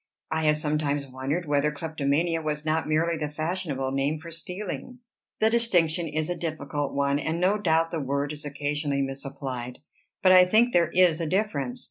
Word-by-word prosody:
"I 160 0 0
have 150 0 +4
sometimes 150 -2 -1
wondered 135 +6 -3
whether 145 +1 +2
kleptomania 160 +2 -1
was 150 -1 -2
not 160 0 0
merely 165 +2 +1
the 150 -1 -3
fashionable 155 -4 -2
name 140 +3 0
for 165 +1 -10
stealing." 190 +8 -6 0.4
"The 220 +1 +3
distinction 175 -8 +2
is 155 0 -1
a 175 - -2
difficult 150 -3 -3
one, 140 0 +1
and 160 +3 -2
no 195 +4 +2
doubt 165 -3 +2
the 165 - -2
word 140 +2 -1
is 150 - -8
occasionally 145 -1 -1
misapplied. 135 -2 -5 0.5
But 185 - +7
I 185 0 +8
think 225 +6 +3
there 170 -2 +4
is 175 -2 +4
a 165 - -1
difference. 150 - -1
155 Hz, 175 wpm, -26 LUFS, 140-170 Hz, 0.5 s, I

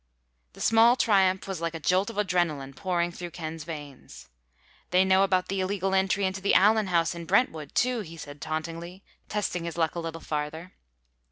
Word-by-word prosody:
The - - -12
small 225 +2 +5
triumph 190 -6 +2
was 190 -4 -4
like 165 0 -2
a - - -4
jolt 185 +6 +1
of 230 - -8
adrenalin 175 -9 0
pouring 175 -1 -1
through 175 0 -7
Ken's 160 -2 -7
veins. 145 -5 -9 0.6
"They 185 +1 +4
know 190 0 +4
about 185 -2 +2
the 195 +1 -2
illegal 190 0 -1
entry 195 +1 +2
into 190 0 -2
the 200 - +2
Allen 210 +2 +5
house 170 -2 +1
in 170 -1 -7
Brentwood, 165 - 0
too," 250 -1 +2
he 165 -5 -8
said 145 -2 -10
tauntingly, 165 +4 -5 0.3
testing 195 -4 -2
his 170 0 -5
luck 160 -2 +1
a 175 - -4
little 165 0 -5
farther. 155 +3 -5
180 Hz, 185 wpm, -27 LUFS, 165-195 Hz, 0.6 s, small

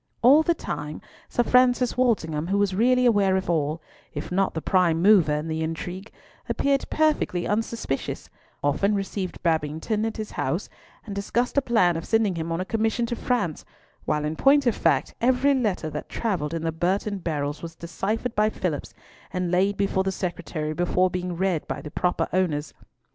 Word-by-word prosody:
All 275 +6 +8
the 335 +1 +1
time 150 - -5 0.3
Sir 240 - +1
Francis 250 0 +3
Walsingham, 170 -11 +1
who 195 +2 +1
was 200 -2 +2
really 250 +5 +3
aware 200 -5 +4
of 190 -2 -1
all, 155 0 -1 0.3
if - - -5
not 190 0 +1
the - - 0
prime 170 -1 +2
mover 185 -4 +5
in 150 +2 -3
the 160 0 -2
intrigue, 175 +5 -5 0.4
appeared 275 -1 +1
perfectly 305 - +1
unsuspicious; 215 -9 -2 0.4
often 195 +9 +2
received 195 -1 -4
Babington 160 +6 0
at 225 - -3
his 215 -1 -5
house, - - -2 0.4
and 205 - -6
discussed 235 +5 -1
a 280 - +4
plan 185 -10 +2
of 165 - -5
sending 225 -4 +2
him 165 -1 -4
on 165 - -1
a 185 - -2
commission 225 +3 0
to 240 - -3
France, 230 -11 -1 0.4
while 150 -1 0
in 155 +1 -2
point 275 - +4
of 240 - +2
fact - - +1
every 260 +3 +3
letter 210 - -1
that - - -6
travelled 170 -9 -2
in 165 - -3
the 165 - 0
Burton 190 +5 -1
barrels 150 -4 -3
was 165 -1 -7
deciphered 205 +8 -3
by 215 +1 +3
Phillipps, 175 -8 -4 0.4
and 180 -2 -2
laid 195 +3 +2
before 195 -1 +1
the 190 - 0
Secretary 175 -4 -3
before 180 +2 +1
being 180 -1 -3
read 185 -4 0
by - - -3
the 150 - -8
proper 180 0 0
owners. 160 -5 0
185 Hz, 180 wpm, -25 LUFS, 165-225 Hz, 0.4 s, All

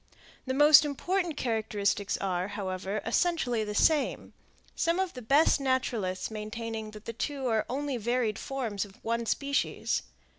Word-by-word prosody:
The 260 - -1
more 295 +2 +5
important 335 +3 -1
characteristics 210 -4 0
are, 185 -1 -1
however, 195 0 -3
essentially 250 -11 +1
the 210 -1 -4
same, 300 +5 +2 0.4
some 335 +2 +1
of 380 -2 -1
the 250 - -8
best 280 +7 +4
naturalists 235 -8 -1
maintaining 220 +1 -5
that 215 0 -12
the 230 - -5
two 275 +3 -3
are 225 -3 +1
only 275 +1 -2
varied 235 -1 0
forms 235 -8 -3
of 200 -1 -12
one 230 0 -1
species. 280 +4 0
235 Hz, 145 wpm, -29 LUFS, 210-280 Hz, 0.4 s, more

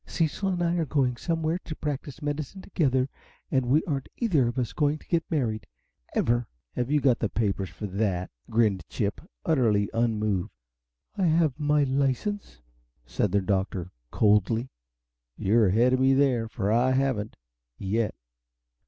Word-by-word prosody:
Cecil 170 +4 0
and 175 -2 0
I 170 0 +2
are 165 - +1
going 135 -4 +1
somewhere 165 +4 -1
and 155 - -7
practice 145 0 -4
medicine 150 +6 -4
together 130 -8 +1 0.4
and 130 -2 +1
we 145 +6 +4
aren't 140 -4 -3
either 165 - +2
of 120 - -3
us 120 -3 -1
going 150 0 +1
to - - -19
get 170 -2 +1
married, 115 -9 -1 0.5
ever!" 120 0 +1 0.3
"Have 125 +1 -2
you 150 0 +3
got 130 -4 +3
the 110 - 0
papers 100 -3 -1
for 105 - -7
that?" 95 -2 -1 0.2
grinned 110 -5 +2
Chip, 105 -3 -2 0.2
utterly 110 -9 +2
unmoved. 110 -5 0 0.7
"I 190 -3 +2
have 160 -3 +2
my 150 0 +3
license," 135 - -1 0.4
said 90 +10 -1
the 100 - +3
Little 95 +1 +2
Doctor, 95 -2 -5 0.2
coldly. 110 +4 +2 0.7
"You're 110 +2 +3
ahead 115 +7 +4
of 130 - +2
me 135 +1 +4
there, 130 -5 +2
for 105 -3 -1
I 125 +3 +3
haven't 130 -6 0 0.4
yet. 105 - -1
125 Hz, 160 wpm, -27 LUFS, 110-150 Hz, 0.7 s, we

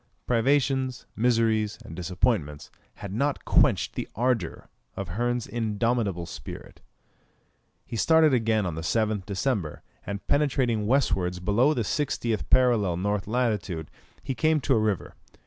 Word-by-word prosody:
Privations, 130 +1 +1
miseries, 115 -2 +1
and 80 - -9
disappointments, 90 - -1 0.2
had 100 -1 -7
not 140 +6 -1
quenched - - +3
the - - -4
ardour 115 -6 -1 0.3
of 100 -3 -4
Hearn's 120 +5 -1
indomitable 110 -4 -1
spirit. 85 - -9 1.0
He - - -7
started 160 +4 +4
again 110 -4 +2
on 90 - -2
the 80 - -5
7th 105 +2 0
December, 100 - -2 0.2
and 100 0 -6
penetrating 125 -7 +1
westwards 95 -9 +1
below 115 +11 +2
the 120 - 0
60th 115 -3 -1
parallel 120 -8 +4
N. 100 +3 -1
lat. 115 -3 0 0.5
he 135 - -2
came 155 +3 +2
to 135 - +2
a 115 - +3
river. 105 -4 -1
115 Hz, 130 wpm, -26 LUFS, 100-125 Hz, 1.0 s, started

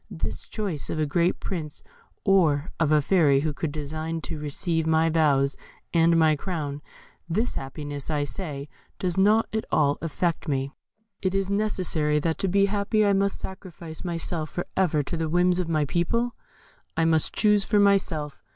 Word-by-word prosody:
This 80 -2 -5
choice 195 -9 -3
of 155 - -2
a 155 - +2
great 170 +4 +1
princess 155 -6 -5 0.4
or 165 -7 +3
of 160 -2 +2
a 150 -1 +4
fairy 145 -6 +4
who 155 0 -1
would 160 - 0
deign 155 +2 -4
to 160 0 -5
receive 160 +2 -1
my 160 0 +3
vows 140 -4 +2 0.4
and 165 0 +4
my 160 -1 +4
crown 145 -3 -4 0.5
this 220 +9 0
happiness, 145 +1 -5
I 150 -2 0
say, 145 -3 -5 0.3
does 180 -2 -1
not 210 +4 +4
at 220 - -1
all 145 -1 +2
affect 170 +1 -2
me. 135 -1 -1 0.5
Is 195 +1 0
it - - +2
necessary 180 -8 +1
that 160 +2 -1
to 195 - 0
be 200 +2 +3
happy 210 +2 +1
I 200 - +4
must 195 0 +1
sacrifice 175 -4 -8
myself 165 -2 -2
for 175 - -4
ever 160 -6 +2
to 155 - -4
the 160 -1 -2
whims 175 +2 +3
of 175 -2 -2
my 155 -2 +1
people? 230 - 0 0.6
I 165 - +3
must 160 -1 +2
choose 210 -2 +3
for 210 - +1
myself. 185 -7 +2
165 Hz, 175 wpm, -25 LUFS, 150-190 Hz, 0.6 s, a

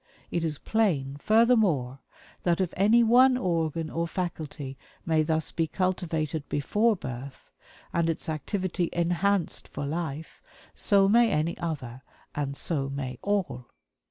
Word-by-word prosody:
It 170 - -1
is 155 -3 -1
plain, 150 -13 0
furthermore, 210 - +3 0.4
that 175 0 +1
if 185 -3 -1
any 215 +5 +5
one 250 +3 +6
organ 165 - -1
or 170 +1 -1
faculty 155 -6 -5 0.3
may 160 -2 +3
thus 160 0 0
be 165 -1 0
cultivated 160 -5 -2
before 210 - +2
birth, 130 -4 -8 0.4
and 170 -1 +1
its 165 +2 -3
activity 175 +3 -2
enhanced 175 +2 0
for 145 - -5
life, 160 0 -4 0.3
so 200 -2 +4
may 230 +3 +5
any 160 -1 0
other 130 -7 -4 0.3
and 140 -1 -3
so 140 -5 -2
may 135 -3 -5
all. 170 -12 -1
165 Hz, 130 wpm, -27 LUFS, 145-195 Hz, 0.4 s, one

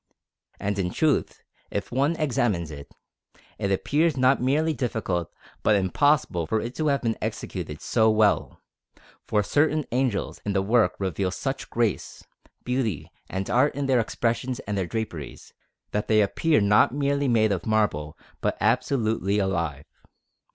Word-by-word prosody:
And 100 0 -2
in 90 -2 0
truth, 150 - 0 0.3
if - - -4
one 140 +6 +1
examines 115 - 0
it, 70 -1 -10 0.7
it 100 - -1
appears 150 - +1
not 130 +1 +3
merely 150 +5 +2
difficult 110 - -2 0.3
but 110 - +3
impossible 100 - +2
for 110 - +1
it 120 +3 -5
to 155 - 0
have 140 -2 +1
been 115 -1 -1
executed 75 0 -5
so 110 -2 +3
well; 110 -1 +2 0.7
for 105 -1 +2
certain 150 +5 +1
angels 125 -4 -1
in 100 - -2
the 95 - +2
work 115 +3 +3
reveal 95 -1 -1
such 135 +8 -4
grace, 115 -3 -2 0.4
beauty, 125 - -2 0.2
and 95 +1 -3
art 130 +4 +2
in 140 0 -2
their 130 -2 +3
expressions 120 +2 -1
and 105 - -4
their 95 -3 -1
draperies, 90 - -6 0.4
that 105 - -2
they 110 -1 +4
appear 150 +10 +2
not 105 +1 +4
merely 140 +1 0
made 110 -3 +3
of 95 0 -2
marble 85 -8 0 0.2
but - - 0
absolutely 110 -3 +1
alive. 85 -7 -1
110 Hz, 150 wpm, -25 LUFS, 95-135 Hz, 0.7 s, they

